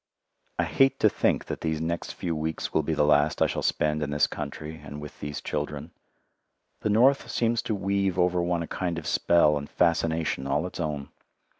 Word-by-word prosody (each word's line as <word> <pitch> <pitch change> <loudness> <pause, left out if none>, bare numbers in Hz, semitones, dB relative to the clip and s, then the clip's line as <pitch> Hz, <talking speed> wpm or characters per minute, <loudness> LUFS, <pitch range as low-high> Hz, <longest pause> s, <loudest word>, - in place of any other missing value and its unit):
I - - +2
hate 135 0 +3
to 110 - +6
think - - +1
that - - -5
these 80 -1 -1
next 85 +1 -3
few 85 -2 -2
weeks 80 0 -3
will 80 - +3
be 80 +1 -2
the 75 - +3
last 75 0 +3
I - - +5
shall - - -2
spend 75 0 0
in 75 - -1
this 75 0 +3
country 75 +1 -6
and 75 0 -8
with 75 -1 -10
these 75 0 -5
children. - - -4 0.9
The - - -1
North 125 +6 +4
seems 115 0 +1
to 110 - -2
weave 100 -1 0
over 90 0 +2
one 85 -1 0
a - - -7
kind 85 -2 -2
of 80 - -6
spell 75 -3 +3
and 70 - -9
fascination 80 -5 +1
all 75 +4 0
its 90 - -7
own. 75 -4 -3
80 Hz, 200 wpm, -27 LUFS, 75-90 Hz, 0.9 s, to